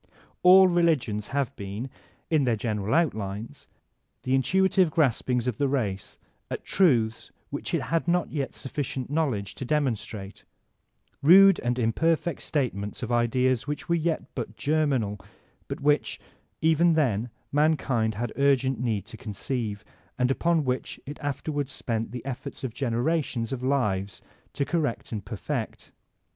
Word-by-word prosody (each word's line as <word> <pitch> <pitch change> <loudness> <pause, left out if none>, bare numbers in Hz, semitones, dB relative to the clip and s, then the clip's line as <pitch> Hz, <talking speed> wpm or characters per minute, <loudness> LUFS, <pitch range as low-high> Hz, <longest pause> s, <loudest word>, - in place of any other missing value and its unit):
All 185 +1 +8
religions 160 - +1
have 140 -3 -2
been, 100 +5 -5 0.4
in 155 -3 +4
their 120 -3 +2
great 105 - -11
general 105 +1 -1
outlines, 110 - -2 0.6
the 130 0 0
intuitive 190 +6 +3
graspings 125 -5 +1
of 125 -4 -2
the 140 - +2
race 105 -9 -2 0.3
at - - -4
truths 120 - +2 0.2
which - - -4
it - - -1
had 165 0 -1
not 175 +1 +1
yet 140 -4 -3
sufficient 135 -1 -4
knowledge 130 -11 -1
to - - -7
demonstrate, 115 -8 -2 0.4
— - - -43
rude 195 +6 +8
and 120 0 -1
imperfect 160 +8 +1
statements 110 -8 -2
of 120 - -3
ideas 125 +2 +2
which 145 0 -4
were 170 - +1
yet 165 -1 0
but 110 -4 -5
germ 155 0 +1
inal, 105 -7 -1 0.5
but - - -5
which, 145 +1 +1 0.4
even 160 +2 +4
then, 125 -7 +1 0.2
mankind 140 -7 +1
had 120 +2 -3
urgent 135 -3 +2
need 110 -5 -1
to 110 +1 -10
conceive, 105 0 -4 0.3
and 125 +1 +2
upon 165 +3 +2
which 125 0 -2
it 145 +2 -8
afterwards 145 -1 -3
spent 115 -4 -3
the 125 0 -7
efforts 135 +1 -6
of 125 -4 -3
generations 125 -1 -1
of 130 - -4
lives 100 -9 0 0.3
to 140 - -1
correct 145 -5 -2
and 105 -3 -4
perfect. - - -5
130 Hz, 150 wpm, -26 LUFS, 110-150 Hz, 0.6 s, All